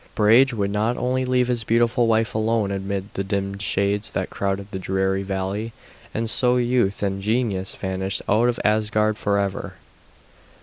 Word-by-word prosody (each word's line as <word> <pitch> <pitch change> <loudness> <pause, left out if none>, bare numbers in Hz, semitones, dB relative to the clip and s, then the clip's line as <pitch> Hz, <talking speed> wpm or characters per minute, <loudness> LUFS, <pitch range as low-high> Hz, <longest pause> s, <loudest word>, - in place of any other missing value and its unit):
Brage 115 +6 +5
would 100 -4 -1
not 110 +4 0
leave 125 0 +1
his 120 -2 -1
beautiful 120 +2 +2
wife 115 0 +1
alone 110 -2 0
amid 100 0 -4
the 100 - -2
dim 100 0 -3
shades 100 +1 0
that - - -2
crowded 100 +1 -3
the 95 - -4
dreary 95 +1 0
valley, 100 +3 -3 0.4
and 115 +1 -2
so 125 +2 +3
youth 120 -5 +1
and 95 -1 -1
genius 105 -3 -1
vanished 95 0 -3
out 115 +4 +3
of 120 - -2
Asgard 105 0 +1
forever. 100 -1 -1
105 Hz, 155 wpm, -23 LUFS, 100-115 Hz, 0.4 s, Brage